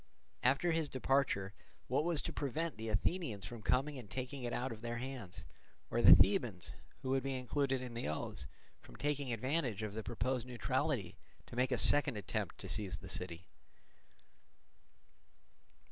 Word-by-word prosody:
After 140 +7 +3
his 160 -2 0
departure, 130 -7 +1 0.3
what 135 +4 +2
was 170 -3 0
to - - -4
prevent 155 +4 -2
the 110 0 -4
Athenians 110 - -1
from 120 -2 -7
coming 135 +7 +1
and 110 -5 -11
taking 130 +3 -4
it 120 - -2
out 125 +2 -2
of 110 -1 -7
their 120 0 -3
hands, 115 -9 -6 0.5
or - - +2
the - - +11
Thebans, - - +2 0.3
who 130 - -1
would 135 0 +2
be 135 0 -2
included 135 +1 0
in 125 -2 -6
the 115 - -3
oaths, 70 -3 -4 0.3
from - - -15
taking 145 -3 -1
advantage 125 -2 0
of 105 -2 -4
the 110 - -3
proposed 120 +2 -2
neutrality 125 - -1 0.3
to - - -11
make 125 +1 +1
a 125 - +2
second 140 -3 +5
attempt 105 - -3
to - - -6
seize 100 -3 -1
the 95 - -10
city? 90 -2 -4
125 Hz, 165 wpm, -36 LUFS, 110-135 Hz, 0.5 s, the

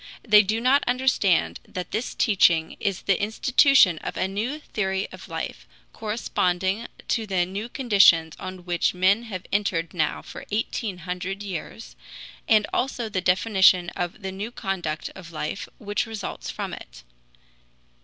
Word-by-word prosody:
They 210 -1 +8
do 215 +2 -1
not 260 +4 +3
understand 245 -8 +2
that 180 -2 -6
this 225 +3 -3
teaching 170 -7 +3
is 195 -3 -2
the 195 -1 +1
institution 220 - +4
of - - -6
a 185 - +1
new 220 +9 -3
theory 190 -8 -2
of - - -11
life, - - -5 0.3
corresponding 195 -2 -1 0.2
to 225 -2 0
the 185 -3 +1
new 200 +5 -5
conditions 195 - +4
on 185 -1 -8
which 175 0 0
men 190 +5 +3
have 185 -5 -6
entered 185 -5 0
now 155 -4 -1
for - - -9
eighteen 210 -2 -2
hundred 185 +2 -4
years, 160 - -7 0.5
and 215 -2 +5
also 245 -3 -1
the 190 -3 -2
definition 185 -1 +4
of 175 +3 -5
the 190 - -3
new 200 +4 -5
conduct 195 -8 -3
of 180 -3 -11
life 155 +3 -4
which 205 +2 -2
results 220 -3 -6
from - - -5
it. - - -11
195 Hz, 150 wpm, -25 LUFS, 180-220 Hz, 0.5 s, They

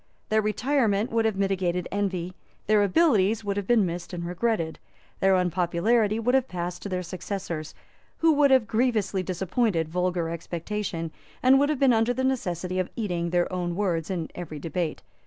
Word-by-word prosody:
Their 220 0 +3
retirement 220 -1 +1
would 225 0 +1
have 220 -2 +1
mitigated 185 -3 0
envy; 185 -3 -2 0.3
their 215 0 +4
abilities 210 - +3
would 200 -1 -2
have 200 -2 -3
been 230 -5 +4
missed 175 +1 -5
and 170 -1 -4
regretted; 180 -2 -1 0.4
their 195 0 +4
unpopularity 185 +5 +1
would 235 +2 0
have 265 -1 +3
passed 175 0 -4
to 200 - -5
their 180 -1 -2
successors, 175 -3 -5 0.4
who 325 0 +4
would 290 -1 +4
have 260 -4 +5
grievously 220 -4 +1
disappointed 185 -1 0
vulgar 180 0 0
expectation, 170 +1 -4 0.3
and 265 +1 +6
would 285 +1 +3
have 305 - 0
been 265 -2 +4
under 225 +2 +2
the 260 - -1
necessity 185 -8 -1
of 185 - -1
eating 175 -6 -2
their 175 +1 0
own 175 -1 -2
words 175 -5 -1
in 170 -4 -3
every 165 -4 -7
debate. 165 +2 -3
190 Hz, 175 wpm, -26 LUFS, 175-225 Hz, 0.4 s, and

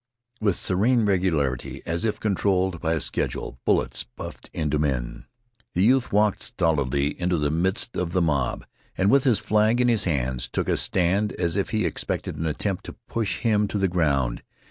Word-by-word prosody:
With 100 -4 +2
serene 110 +5 +2
regularity, 80 -10 0
as 85 +4 -1
if 105 -2 -1
controlled 95 -4 0
by 80 -1 +1
a 80 - 0
schedule, 60 - -3
bullets - - +1
buffed - - -10
into 75 -2 -1
men. 65 -5 -2 0.5
The 90 - +3
youth 125 +3 +3
walked 105 0 +2
stolidly 70 -3 0
into 90 0 +1
the 75 -1 0
midst 95 +8 0
of 90 -2 -2
the 90 - +1
mob, 70 -7 0 0.3
and 95 +2 +3
with 140 +1 +4
his 120 -6 +4
flag 110 +3 +2
in 125 0 +3
his 110 -3 +2
hands 65 -6 -1
took - - -2
a - - +2
stand 95 +3 +1
as 85 -1 -1
if 100 - 0
he 110 -1 0
expected - - -3
an 80 - -2
attempt 90 +5 -2
to - - -8
push 110 -4 -2
him 105 -3 +2
to 105 - -3
the 95 -1 +2
ground. 70 -9 0
90 Hz, 185 wpm, -25 LUFS, 75-105 Hz, 0.5 s, with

